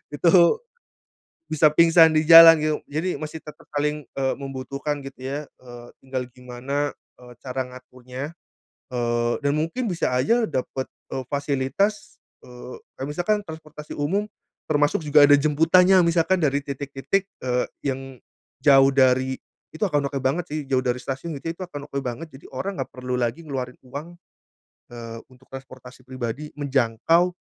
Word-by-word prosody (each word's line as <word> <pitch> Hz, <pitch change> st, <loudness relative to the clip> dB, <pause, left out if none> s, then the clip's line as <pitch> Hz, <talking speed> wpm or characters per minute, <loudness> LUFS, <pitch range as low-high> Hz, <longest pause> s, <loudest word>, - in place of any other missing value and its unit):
Itu 165 Hz, +3 st, +3 dB, 1.2 s
bisa 155 Hz, -1 st, +3 dB
pingsan 165 Hz, +1 st, +6 dB
di 155 Hz, 0 st, +1 dB
jalan 165 Hz, -1 st, +10 dB
gitu, 155 Hz, 0 st, 0 dB, 0.2 s
jadi 165 Hz, +5 st, -1 dB
masih 155 Hz, +1 st, -6 dB
tetep 150 Hz, -, -13 dB
saling, 150 Hz, 0 st, -1 dB, 0.2 s
eee, 135 Hz, -1 st, +1 dB
membutuhkan 140 Hz, +2 st, -5 dB
gitu 135 Hz, -2 st, -11 dB
ya. 140 Hz, +2 st, -4 dB, 0.2 s
Eee, 120 Hz, -1 st, -11 dB, 0.2 s
tinggal 130 Hz, -1 st, -4 dB
gimana, 130 Hz, +3 st, -3 dB, 0.3 s
eee, 125 Hz, -, -13 dB
cara 130 Hz, +1 st, -4 dB
ngaturnya, 130 Hz, +4 st, -9 dB, 0.5 s
eee, 120 Hz, -2 st, -1 dB
dan 140 Hz, -, +2 dB
mungkin 165 Hz, -, -2 dB
bisa 165 Hz, -7 st, -1 dB
aja 225 Hz, -, +2 dB
dapet, 130 Hz, -2 st, -3 dB, 0.2 s
eee, 130 Hz, -, -4 dB
fasilitas, 145 Hz, +9 st, -1 dB, 0.3 s
eee 125 Hz, 0 st, -10 dB, 0.2 s
kaya 135 Hz, -, -5 dB
misalkan 180 Hz, +7 st, 0 dB
transportasi 155 Hz, -3 st, -11 dB
umum 195 Hz, +9 st, -1 dB, 0.4 s
termasuk 145 Hz, +1 st, +2 dB
juga 150 Hz, -1 st, +6 dB
ada 145 Hz, -, +6 dB
jemputannya 165 Hz, +6 st, +4 dB
misalkan 170 Hz, +2 st, +2 dB
dari 145 Hz, -2 st, +1 dB
titik-titik, 140 Hz, +7 st, -2 dB, 0.2 s
eee, 125 Hz, -1 st, 0 dB, 0.2 s
yang 135 Hz, -1 st, -1 dB, 0.6 s
jauh 135 Hz, -1 st, +6 dB
dari 130 Hz, 0 st, +3 dB, 0.4 s
itu 160 Hz, -, -12 dB
akan 145 Hz, -8 st, +1 dB
oke 140 Hz, -1 st, -4 dB
banget 160 Hz, +6 st, 0 dB
sih, 155 Hz, -, -1 dB
jauh 130 Hz, -2 st, +2 dB
dari 125 Hz, 0 st, 0 dB
stasiun 140 Hz, +5 st, -5 dB
gitu 165 Hz, -, -3 dB
itu -, -, -11 dB
akan 145 Hz, -4 st, -9 dB
oke 140 Hz, -, -3 dB
banget, 150 Hz, +7 st, -5 dB
jadi -, -, -19 dB
orang 190 Hz, +8 st, -4 dB
gak -, -, -4 dB
perlu 125 Hz, 0 st, -3 dB
lagi 120 Hz, +5 st, -1 dB
ngeluarin 130 Hz, -4 st, -5 dB
uang, 145 Hz, +7 st, -8 dB, 0.8 s
eee, 115 Hz, -1 st, -8 dB
untuk 130 Hz, +1 st, -21 dB
transportasi 130 Hz, -1 st, -11 dB
pribadi 130 Hz, +3 st, -5 dB
menjangkau 140 Hz, +6 st, +1 dB
140 Hz, 150 wpm, -23 LUFS, 130-160 Hz, 1.2 s, jalan